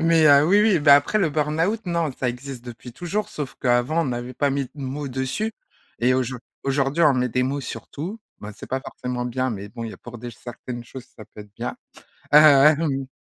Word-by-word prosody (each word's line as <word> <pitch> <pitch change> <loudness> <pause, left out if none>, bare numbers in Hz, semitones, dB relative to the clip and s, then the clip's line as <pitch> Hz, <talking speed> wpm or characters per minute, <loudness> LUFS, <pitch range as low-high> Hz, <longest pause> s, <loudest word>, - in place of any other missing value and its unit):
mais, 165 -1 +4
heu, 145 +1 +7
oui, 200 +4 +5
oui, 210 -6 +4
bah 145 -1 +7
après 145 +9 +2
le 180 -5 +2
burn-out, 160 +8 0
non, 170 -5 0
ça 125 0 -2
existe 125 0 -7
depuis 120 0 -10
toujours, 190 - -3
sauf 140 -3 -6
qu'avant, 125 +6 +2
on - - -2
n'avait 125 -1 -4
pas 140 +2 +1
mis 140 0 -1
de - - -24
mots 140 +2 -4
dessus 130 - -2 0.5
et 125 +2 +3
aujour 130 -1 -1 0.2
aujourd'hui 135 +4 0
on 150 -3 +5
met 125 0 +1
des 125 +2 0
mots 140 +2 -1
sur - - -7
tout. 185 +10 -6 0.2
Ben 105 +1 -8
c'est - - -10
pas 130 - -2
forcément 125 -1 -5
bien 130 +2 -1
mais 100 -2 -6
bon, 115 +3 -7
il 110 - -5
y - - -9
a - - -10
pour 120 -1 -10
des 120 +1 -7
certaines 120 +2 -8
choses 130 +1 -10
ça 110 - -10
peut 105 - -13
être 105 0 -14
bien. - - -5 0.6
Hem. 150 -1 +6
135 Hz, 225 wpm, -23 LUFS, 125-155 Hz, 0.6 s, heu